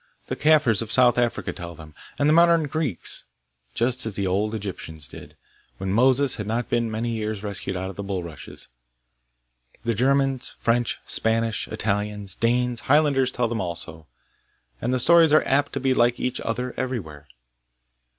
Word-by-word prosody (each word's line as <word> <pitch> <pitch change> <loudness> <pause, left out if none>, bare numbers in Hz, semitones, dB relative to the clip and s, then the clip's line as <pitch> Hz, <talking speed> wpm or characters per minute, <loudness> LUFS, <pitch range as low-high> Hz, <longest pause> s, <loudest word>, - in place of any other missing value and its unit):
The - - -1
Kaffirs 150 -9 +4
of 115 -1 -5
South 125 -1 +5
Africa 120 -1 -1
tell 85 -1 -8
them, 80 0 -13 0.2
and 145 - +2
the 155 - +5
modern 170 0 +5
Greeks, 150 - -3 0.5
just 125 +2 0
as 105 - -4
the 100 - -1
old 105 +4 0
Egyptians 80 -8 -6
did, - - -12 0.4
when 95 0 -3
Moses 130 +4 +3
had 105 -2 -5
not 115 +3 -2
been 120 -1 0
many 115 +2 -2
years 110 -2 -3
rescued 100 -2 -4
out 95 +1 -4
of 95 - -15
the - - -3
bulrushes. 90 -7 -6 1.2
The 115 0 0
Germans, 135 +2 +1
French, 120 +1 0
Spanish, 115 -1 0
Italians, 105 -1 -3
Danes, 120 +1 0
Highlanders 140 -2 +3
tell 120 -1 0
them 115 -2 -2
also, 85 -3 -6 0.7
and 120 - -1
the 130 - +2
stories 165 +4 +5
are 155 - +6
apt 145 +2 +1
to 140 - -2
be 135 0 +1
like 120 -1 +2
each 125 0 -2
other 125 +2 -3
everywhere. 80 - -5
115 Hz, 165 wpm, -24 LUFS, 100-130 Hz, 1.2 s, are